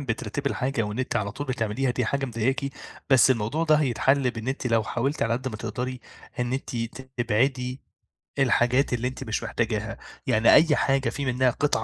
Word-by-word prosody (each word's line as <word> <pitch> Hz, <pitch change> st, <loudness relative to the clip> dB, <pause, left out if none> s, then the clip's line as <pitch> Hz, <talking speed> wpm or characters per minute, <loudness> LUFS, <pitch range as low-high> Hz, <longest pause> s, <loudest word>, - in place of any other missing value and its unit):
بترتبي 130 Hz, +1 st, -3 dB
الحاجة 130 Hz, -2 st, -1 dB
وإن 105 Hz, +2 st, -4 dB
أنتِ 130 Hz, -2 st, -1 dB
على 100 Hz, -3 st, -1 dB
طول 145 Hz, +5 st, -5 dB
بتعمليها 125 Hz, 0 st, -1 dB
دي 125 Hz, 0 st, -1 dB
حاجة 140 Hz, +4 st, -1 dB
مضايقاكِ، 125 Hz, +4 st, -1 dB, 0.5 s
بس 130 Hz, 0 st, +6 dB
الموضوع 130 Hz, +7 st, 0 dB
ده 155 Hz, -1 st, +5 dB
هيتحَلّ 135 Hz, -1 st, +2 dB
بإن 115 Hz, 0 st, -6 dB
أنتِ 135 Hz, 0 st, -2 dB
لو 115 Hz, -2 st, +2 dB
حاولتِ 135 Hz, +6 st, -1 dB
على 115 Hz, -, +1 dB
قد 130 Hz, +3 st, -2 dB
ما 110 Hz, -, -6 dB
تقدري 120 Hz, +4 st, -4 dB, 0.4 s
إن 120 Hz, 0 st, -1 dB
أنتِ 130 Hz, -2 st, -3 dB, 0.4 s
تبعدي 125 Hz, +3 st, 0 dB, 0.6 s
الحاجات 125 Hz, 0 st, +3 dB
اللي 125 Hz, +1 st, 0 dB
أنتِ 130 Hz, -, -6 dB
مش 110 Hz, -, -3 dB
محتاجاها، 110 Hz, -2 st, -2 dB, 0.3 s
يعني 110 Hz, +1 st, +5 dB
أي 155 Hz, -2 st, +6 dB
حاجة 135 Hz, 0 st, +1 dB
في 140 Hz, -, -4 dB
منها 130 Hz, 0 st, +2 dB
قطعة 140 Hz, -2 st, 0 dB
125 Hz, 185 wpm, -25 LUFS, 115-135 Hz, 0.6 s, بس